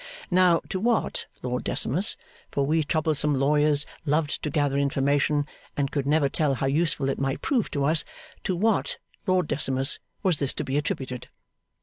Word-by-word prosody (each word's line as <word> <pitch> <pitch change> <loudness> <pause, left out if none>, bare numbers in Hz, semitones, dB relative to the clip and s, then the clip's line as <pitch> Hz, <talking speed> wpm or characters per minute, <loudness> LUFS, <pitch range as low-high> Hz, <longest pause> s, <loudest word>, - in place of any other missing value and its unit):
Now, 180 -2 +4
to 190 - -2
what, 230 +2 0 0.2
Lord 125 0 -2
Decimus 180 - +2 0.3
for 140 - 0
we 155 +2 +2
troublesome 150 -1 +1
lawyers 145 +1 +3 0.2
loved 150 -1 0
to 150 - -2
gather 145 -1 0
information, 140 +1 +1 0.3
and 140 -1 0
could 140 -2 -2
never 150 -1 +3
tell 140 0 0
how 135 - -2
useful 145 0 +1
it 135 - -1
might 135 0 -2
prove 250 -7 +1
to 140 -1 -1
us 155 +2 +2 0.4
to 185 - 0
what, 215 +4 +1 0.3
Lord 185 -3 +2
Decimus, 135 -1 +2 0.2
was 180 -6 +2
this 140 -2 0
to - - -2
be 135 - -3
attributed? 130 -4 -3
145 Hz, 165 wpm, -26 LUFS, 140-165 Hz, 0.4 s, Now